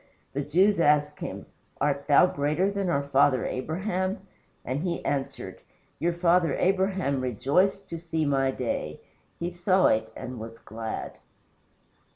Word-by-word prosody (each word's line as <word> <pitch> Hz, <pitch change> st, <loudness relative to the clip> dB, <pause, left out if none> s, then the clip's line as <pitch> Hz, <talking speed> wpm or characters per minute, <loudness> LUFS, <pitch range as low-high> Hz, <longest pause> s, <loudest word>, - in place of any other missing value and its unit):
The 140 Hz, -, -1 dB
Jews 185 Hz, +7 st, +3 dB
asked 150 Hz, -1 st, +3 dB
him, -, -, -6 dB, 0.3 s
"Art 140 Hz, -1 st, 0 dB
thou 145 Hz, -, +7 dB
greater 155 Hz, +4 st, 0 dB
than 200 Hz, -2 st, -1 dB
our 140 Hz, -4 st, +1 dB
father 140 Hz, -3 st, +3 dB
Abraham?" 185 Hz, +7 st, -2 dB, 0.4 s
And 130 Hz, +3 st, -2 dB
he 175 Hz, -1 st, -3 dB
answered, 135 Hz, -2 st, -3 dB, 0.4 s
"Your 170 Hz, +2 st, +1 dB
father 170 Hz, -2 st, +3 dB
Abraham 190 Hz, -7 st, +1 dB
rejoiced 140 Hz, -, +1 dB
to 165 Hz, -, -5 dB
see 160 Hz, -2 st, -2 dB
my 135 Hz, -2 st, +2 dB
day 130 Hz, -2 st, -3 dB, 0.4 s
he 175 Hz, +1 st, -2 dB
saw 185 Hz, +2 st, +2 dB
it, 110 Hz, 0 st, 0 dB
and 125 Hz, -2 st, -7 dB
was 115 Hz, +1 st, -8 dB
glad." 110 Hz, 0 st, -6 dB
150 Hz, 140 wpm, -27 LUFS, 135-180 Hz, 0.4 s, thou